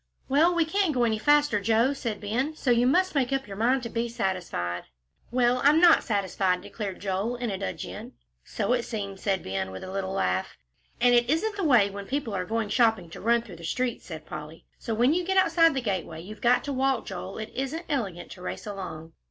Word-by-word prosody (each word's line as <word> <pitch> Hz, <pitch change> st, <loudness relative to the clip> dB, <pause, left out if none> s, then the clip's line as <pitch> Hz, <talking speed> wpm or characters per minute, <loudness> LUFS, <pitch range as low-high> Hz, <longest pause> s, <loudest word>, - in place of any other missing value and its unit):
"Well, 315 Hz, +6 st, +4 dB
we 335 Hz, -1 st, +3 dB
can't 360 Hz, -2 st, +1 dB
go 245 Hz, -, +2 dB
any 220 Hz, -2 st, +1 dB
faster, 290 Hz, -5 st, +3 dB
Joe," 230 Hz, +6 st, +3 dB
said 230 Hz, -6 st, -4 dB
Ben, 250 Hz, +9 st, -2 dB
"so 265 Hz, -, 0 dB
you 240 Hz, +1 st, +4 dB
must 370 Hz, +8 st, +3 dB
make 270 Hz, -3 st, +1 dB
up 270 Hz, 0 st, 0 dB
your 195 Hz, -, -7 dB
mind 245 Hz, +5 st, +2 dB
to 230 Hz, -, -4 dB
be 235 Hz, +1 st, -2 dB
satisfied." 180 Hz, -, -3 dB, 0.4 s
"Well, 250 Hz, 0 st, +2 dB
I'm 295 Hz, +3 st, +6 dB
not 345 Hz, -1 st, +6 dB
satisfied," 190 Hz, -3 st, 0 dB
declared 200 Hz, -4 st, -6 dB
Joel, 200 Hz, +5 st, -2 dB
in 240 Hz, -2 st, -3 dB
a 195 Hz, -, -2 dB
dudgeon. 215 Hz, +4 st, -6 dB, 0.3 s
"So -, -, -1 dB
it 245 Hz, -, +2 dB
seems," 200 Hz, -4 st, -5 dB
said 195 Hz, -2 st, 0 dB
Ben, 95 Hz, 0 st, -3 dB
with 95 Hz, -, -8 dB
a 185 Hz, -, -7 dB
little 190 Hz, -1 st, -3 dB
laugh. 95 Hz, -, -1 dB, 0.4 s
"And 245 Hz, 0 st, +5 dB
it 240 Hz, 0 st, +4 dB
isn't 410 Hz, +8 st, +1 dB
the 400 Hz, -, -3 dB
way, 240 Hz, -10 st, +4 dB
when 200 Hz, 0 st, -7 dB
people 270 Hz, -4 st, -2 dB
are 185 Hz, -1 st, -2 dB
going 220 Hz, +1 st, -2 dB
shopping, 220 Hz, -7 st, +2 dB
to -, -, -9 dB
run 235 Hz, +2 st, +2 dB
through 190 Hz, -7 st, -11 dB
the 170 Hz, -, -12 dB
street," 245 Hz, +8 st, -2 dB
said 160 Hz, -3 st, -9 dB
Polly, 155 Hz, +2 st, -9 dB
"so 225 Hz, -, -3 dB
when 245 Hz, +6 st, +4 dB
you 360 Hz, +2 st, 0 dB
get 380 Hz, +2 st, 0 dB
outside 330 Hz, -4 st, +4 dB
the 265 Hz, -, 0 dB
gateway, 185 Hz, -7 st, -3 dB
you've 205 Hz, +5 st, -10 dB
got 245 Hz, +1 st, +4 dB
to 285 Hz, -, -3 dB
walk, 265 Hz, 0 st, +1 dB
Joel. 190 Hz, 0 st, -6 dB
It 215 Hz, 0 st, -6 dB
isn't 275 Hz, +6 st, -3 dB
elegant 200 Hz, -, -3 dB
to 180 Hz, -, -10 dB
race 185 Hz, -, -5 dB
along." 165 Hz, -6 st, -7 dB
230 Hz, 225 wpm, -27 LUFS, 195-270 Hz, 0.4 s, I'm